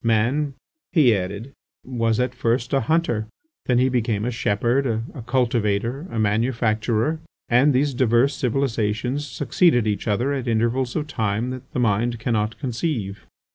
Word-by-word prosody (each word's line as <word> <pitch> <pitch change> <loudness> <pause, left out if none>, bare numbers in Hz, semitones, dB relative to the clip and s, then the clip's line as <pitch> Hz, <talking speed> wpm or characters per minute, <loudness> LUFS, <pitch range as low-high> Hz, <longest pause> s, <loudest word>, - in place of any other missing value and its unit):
"Man," 125 +6 +1 0.4
he 130 - +5
added, 100 +7 -4 0.3
"was 115 -3 0
at 125 0 0
first 120 0 -1
a 135 - +4
hunter, 120 -5 0 0.4
then 125 - +3
he 130 +1 +4
became 115 -4 0
a 125 - -1
shepherd, 120 +4 +1 0.3
a 130 - -7
cultivator, 120 - 0
a 115 - -5
manufacturer... 115 +5 +1 0.3
and 125 +5 +5
these 140 +2 +1
diverse 125 +2 +2
civilizations 125 +1 -1
succeeded 135 - +2
each 105 +1 -2
other 120 +7 +1
at 130 -3 -3
intervals 120 +2 0
of 150 - -1
time 115 -3 -2
that 130 0 -9
the - - -1
mind 115 +1 +1
cannot 110 -2 -1
conceive." 115 - -3
120 Hz, 145 wpm, -23 LUFS, 110-130 Hz, 0.4 s, he